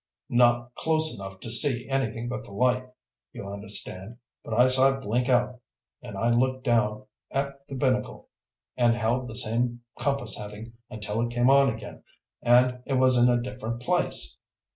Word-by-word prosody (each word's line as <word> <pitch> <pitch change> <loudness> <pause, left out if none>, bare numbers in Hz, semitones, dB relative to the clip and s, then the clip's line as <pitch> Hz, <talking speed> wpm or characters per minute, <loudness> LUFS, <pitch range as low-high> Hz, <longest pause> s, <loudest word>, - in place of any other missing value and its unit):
Not 120 0 +2
close 160 0 0
enough 95 -2 -9
to 115 - -3
see 120 0 +5
anything 135 -3 -2
but 130 +1 -5
the - - -14
light, 125 +4 0 0.4
you 100 - -8
understand. 100 +1 -2 0.3
But 110 - -4
I 125 +2 +5
saw 130 +1 +4
it - - -11
blink 120 +4 -1
out, 125 0 +1 0.4
and - - -9
I 115 +1 +1
looked 130 +2 0
down 110 -4 0 0.2
at 140 0 -4
the 135 - -7
binnacle 130 -1 -1 0.5
and 120 -2 +3
held 120 +2 -1
the 115 - -8
same 120 +1 0 0.2
compass 140 +2 0
heading 105 +2 -9 0.2
until 105 +1 -3
it 120 0 -2
came 120 +2 +3
on 140 -1 +5
again, 110 -2 -9 0.4
and 125 +1 +3
it 135 - -2
was 130 0 +4
in 120 0 +4
a 120 0 +2
different 120 -1 -6
place. - - -1
120 Hz, 170 wpm, -26 LUFS, 115-130 Hz, 0.5 s, see